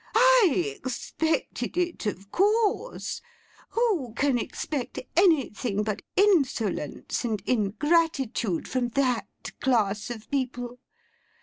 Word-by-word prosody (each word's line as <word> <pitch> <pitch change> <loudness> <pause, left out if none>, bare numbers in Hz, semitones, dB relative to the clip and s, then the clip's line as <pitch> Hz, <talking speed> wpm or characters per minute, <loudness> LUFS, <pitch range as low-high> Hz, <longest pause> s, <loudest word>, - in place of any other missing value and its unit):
I 425 - +5
expected 315 +7 -2
it, 345 -9 -1
of 200 0 -5
course; 430 +4 +1 0.5
who 375 - 0
can 270 -3 +2
expect 265 +2 -4 0.2
anything 265 - +2
but 210 -1 -3
insolence 275 - +1
and 220 -3 -1
ingratitude 255 - +1
from 255 -2 0
that 255 -4 +1 0.3
class 215 -5 +1
of 225 -3 -7
people! 250 -2 -2
260 Hz, 95 wpm, -27 LUFS, 220-340 Hz, 0.5 s, I